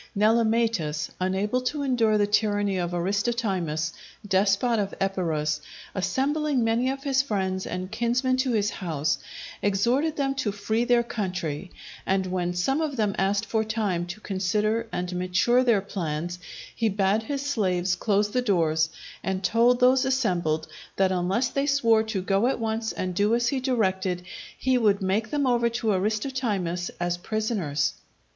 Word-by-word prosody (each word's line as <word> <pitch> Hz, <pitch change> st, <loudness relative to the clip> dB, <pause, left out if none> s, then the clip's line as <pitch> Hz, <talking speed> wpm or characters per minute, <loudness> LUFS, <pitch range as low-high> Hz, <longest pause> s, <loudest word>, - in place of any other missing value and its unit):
Nelematus, 220 Hz, -8 st, +2 dB
unable 195 Hz, +6 st, 0 dB
to 285 Hz, +3 st, -2 dB
endure 230 Hz, -5 st, +2 dB
the 205 Hz, -, +3 dB
tyranny 205 Hz, -2 st, +1 dB
of 175 Hz, -1 st, -1 dB
Aristotimus, 185 Hz, -4 st, -1 dB, 0.3 s
despot 200 Hz, +4 st, +2 dB
of 200 Hz, -1 st, -2 dB
Epirus, 160 Hz, -6 st, -1 dB, 0.3 s
assembling 275 Hz, +6 st, 0 dB
many 230 Hz, +3 st, +1 dB
of 270 Hz, 0 st, -4 dB
his 270 Hz, -2 st, +2 dB
friends 190 Hz, -7 st, -2 dB
and 185 Hz, +1 st, -4 dB
kinsmen 240 Hz, +3 st, +1 dB
in 260 Hz, -, -1 dB
his 210 Hz, -2 st, +1 dB
house, 155 Hz, -4 st, -1 dB, 0.4 s
exhorted 240 Hz, +11 st, +1 dB
them 275 Hz, -1 st, 0 dB
to 260 Hz, -6 st, -1 dB
free 220 Hz, +4 st, -1 dB
their 240 Hz, -1 st, +4 dB
country; 180 Hz, -7 st, -3 dB, 0.3 s
and 190 Hz, 0 st, +1 dB
when 180 Hz, -1 st, -2 dB
some 270 Hz, -, +1 dB
of 305 Hz, -3 st, -2 dB
them 210 Hz, -3 st, +1 dB
asked 200 Hz, +2 st, +1 dB
for 220 Hz, -1 st, 0 dB
time 210 Hz, -6 st, -1 dB
to 175 Hz, +4 st, -7 dB
consider 210 Hz, +4 st, 0 dB
and 180 Hz, 0 st, -3 dB
mature 185 Hz, +8 st, +2 dB
their 230 Hz, -5 st, +3 dB
plans, 175 Hz, -3 st, -4 dB, 0.4 s
he 225 Hz, -1 st, +1 dB
bade 200 Hz, +1 st, +1 dB
his 280 Hz, +5 st, -4 dB
slaves 185 Hz, -9 st, +1 dB
close 205 Hz, +1 st, +1 dB
the 250 Hz, -, +1 dB
doors, 160 Hz, -7 st, +2 dB, 0.3 s
and 190 Hz, 0 st, -2 dB
told 235 Hz, +5 st, +3 dB
those 255 Hz, +1 st, +5 dB
assembled 180 Hz, -, 0 dB, 0.3 s
that 190 Hz, -1 st, +2 dB
unless 190 Hz, +7 st, +1 dB
they 275 Hz, +1 st, -1 dB
swore 230 Hz, -6 st, +4 dB
to 220 Hz, -4 st, -3 dB
go 195 Hz, +4 st, +2 dB
at 265 Hz, -, 0 dB
once 225 Hz, 0 st, -1 dB
and 185 Hz, -1 st, -3 dB
do 205 Hz, +5 st, +2 dB
as 240 Hz, 0 st, +1 dB
he 275 Hz, -, 0 dB
directed 190 Hz, -8 st, 0 dB, 0.3 s
he 255 Hz, -1 st, +2 dB
would 205 Hz, -3 st, +3 dB
make 205 Hz, +4 st, 0 dB
them 290 Hz, +1 st, 0 dB
over 240 Hz, -2 st, +2 dB
to 230 Hz, -1 st, -1 dB
Aristotimus 205 Hz, -4 st, -1 dB
as 175 Hz, 0 st, -1 dB
prisoners. 185 Hz, -8 st, -1 dB
210 Hz, 155 wpm, -26 LUFS, 185-240 Hz, 0.4 s, those